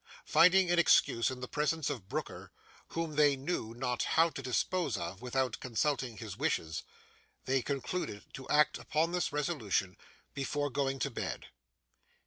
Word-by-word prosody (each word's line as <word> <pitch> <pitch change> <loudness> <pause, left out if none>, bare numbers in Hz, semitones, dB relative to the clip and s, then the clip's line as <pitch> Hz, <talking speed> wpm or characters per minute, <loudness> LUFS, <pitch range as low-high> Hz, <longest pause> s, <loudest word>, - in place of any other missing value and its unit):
Finding 180 0 +5
an 175 - +4
excuse 115 -7 +4
in 130 -1 -6
the 125 - -4
presence 150 +2 0
of 100 -7 -7
Brooker, - - -5 0.4
whom 165 -3 -4
they 145 -2 +5
knew 135 -5 -3
not 125 0 -1
how 165 +1 +3
to 135 - -6
dispose 140 +4 0
of 85 +4 -5
without 125 -1 -1
consulting 130 -1 -1
his 110 -5 -7
wishes, 85 - -1 0.6
they 135 0 +2
concluded 140 - -3
to 135 - -9
act 150 0 +4
upon 160 +2 0
this 180 -3 0
resolution 135 - -1 0.4
before 145 +1 -2
going 135 0 0
to 130 - -2
bed. - - -5
135 Hz, 150 wpm, -32 LUFS, 120-155 Hz, 0.6 s, Finding